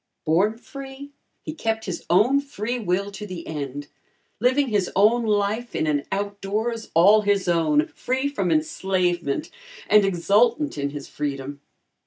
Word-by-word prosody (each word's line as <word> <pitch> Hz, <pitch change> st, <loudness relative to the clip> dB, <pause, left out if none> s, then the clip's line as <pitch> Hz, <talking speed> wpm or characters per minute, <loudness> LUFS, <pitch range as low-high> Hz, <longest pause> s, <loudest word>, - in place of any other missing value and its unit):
Born 190 Hz, +8 st, +2 dB
free, 275 Hz, +2 st, -10 dB, 0.3 s
he 310 Hz, -, -5 dB
kept 225 Hz, -7 st, -2 dB
his 180 Hz, -, -5 dB
own 225 Hz, +10 st, +4 dB
free 245 Hz, -3 st, -4 dB
will 200 Hz, -1 st, -1 dB
to 210 Hz, +1 st, -7 dB
the 180 Hz, -3 st, -7 dB
end, 145 Hz, -2 st, -5 dB, 0.5 s
living 260 Hz, +4 st, +2 dB
his 205 Hz, -4 st, +1 dB
own 220 Hz, +5 st, +4 dB
life 210 Hz, +3 st, 0 dB
in -, -, 0 dB
an 145 Hz, -2 st, 0 dB
out 200 Hz, +1 st, -3 dB
doors 220 Hz, +3 st, -2 dB
all 200 Hz, +6 st, +6 dB
his 200 Hz, -2 st, +1 dB
own, 155 Hz, -3 st, +3 dB
free 265 Hz, +2 st, -2 dB
from 285 Hz, -, -1 dB
enslavement 185 Hz, -, 0 dB, 0.4 s
and 210 Hz, -1 st, +6 dB
exultant 210 Hz, -, +2 dB
in 140 Hz, -1 st, -2 dB
his 145 Hz, -1 st, -7 dB
freedom. 140 Hz, -1 st, -5 dB
205 Hz, 150 wpm, -23 LUFS, 170-235 Hz, 0.5 s, all